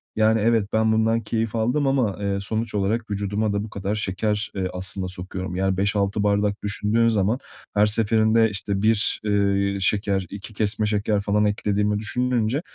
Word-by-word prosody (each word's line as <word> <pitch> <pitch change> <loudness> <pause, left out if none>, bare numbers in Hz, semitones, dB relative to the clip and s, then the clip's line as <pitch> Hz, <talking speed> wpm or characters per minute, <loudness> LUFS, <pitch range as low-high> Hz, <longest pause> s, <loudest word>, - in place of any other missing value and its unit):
Yani, 110 0 +3
evet, 115 -2 +2
ben 110 0 +3
bundan 110 +1 +2
keyif 115 0 -2
aldım 125 +6 +1
ama, 125 -9 +1
eee, 100 -1 -1
sonuç 110 +2 -3
olarak 105 +3 -1
vücuduma 100 +1 -1
da 100 0 -1
bu 110 - -7
kadar 100 0 -3
şeker, 105 +1 -1
eee, 95 -1 -1
aslında 95 +1 -3
sokuyorum. 90 0 -6
Yani, 95 0 0
5-6 100 +1 0
bardak 100 0 0
düşündüğün 105 +3 +1
zaman 110 +2 +1 0.4
her 105 +1 +5
seferinde, 110 +1 +3
işte, 100 -1 -2
1, 110 0 +2
eee, 100 -1 +1
şeker, 100 -1 +1
2 105 +2 -8
kesme 105 0 0
şeker 105 0 0
falan 105 +1 +1
eklediğimi 105 0 0
düşününce, 125 +3 0
105 Hz, 165 wpm, -23 LUFS, 100-110 Hz, 0.4 s, her